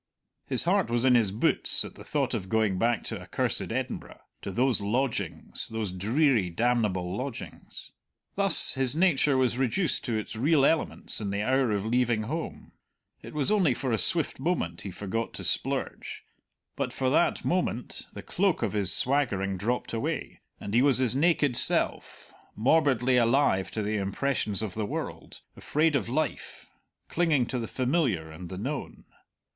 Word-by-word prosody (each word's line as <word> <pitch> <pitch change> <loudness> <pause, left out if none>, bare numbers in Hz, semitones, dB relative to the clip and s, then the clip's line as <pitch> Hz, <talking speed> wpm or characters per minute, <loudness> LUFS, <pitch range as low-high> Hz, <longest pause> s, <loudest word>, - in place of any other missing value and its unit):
His - - +5
heart - - +1
was 120 +1 0
in 130 - +5
his 115 -5 +3
boots 105 - +3
at - - -10
the - - -13
thought - - -1
of 95 - -4
going 110 -4 +1
back 120 +2 +1
to - - -5
accursed - - -2
Edinburgh - - -5 0.2
to - - -6
those 125 +1 +2
lodgings, 120 +5 -1
those 110 -4 -4
dreary, 110 - +1
damnable 95 -3 0
lodgings. 130 +1 -7 0.4
Thus 195 -3 +4
his 130 0 +3
nature 155 -5 +3
was 125 -1 +1
reduced 145 - 0
to 115 -3 -1
its 110 - -5
real 140 +4 +3
elements 160 -7 +1
in 100 - -3
the 100 +1 -2
hour 130 0 +1
of 100 -1 -1
leaving 120 -1 +1
home; 155 +9 -6 0.5
it - - -11
was 145 +2 +1
only 180 -12 +3
for 130 0 -3
a 110 - +1
swift 165 -6 +2
moment 130 - -2
he 100 - -6
forgot 105 +5 -4
to - - -6
splurge, - - -2 0.5
but - - -3
for 130 -1 -1
that 165 - +1
moment 170 -9 -2
the - - -9
cloak - - 0
of - - -1
his 100 -4 +3
swaggering 110 -8 +1
dropped 115 +8 -3
away, 145 +6 -4 0.2
and 100 - -7
he 120 - +4
was 140 -1 +5
his 130 -2 +1
naked 145 -3 +2
self, - - +1 0.2
morbidly 130 0 +2
alive 115 -6 +2
to 110 - -4
the 105 +1 -1
impressions 105 +1 -1
of 105 -4 -4
the 110 - -3
world, - - -6
afraid 155 0 0
of 120 -9 -1
life, - - -4 0.4
clinging 160 -7 +1
to 125 +1 -3
the 115 - -4
familiar 125 - -1
and 85 +2 -9
the 95 - -7
known. 135 +9 -6
120 Hz, 170 wpm, -27 LUFS, 105-140 Hz, 0.5 s, His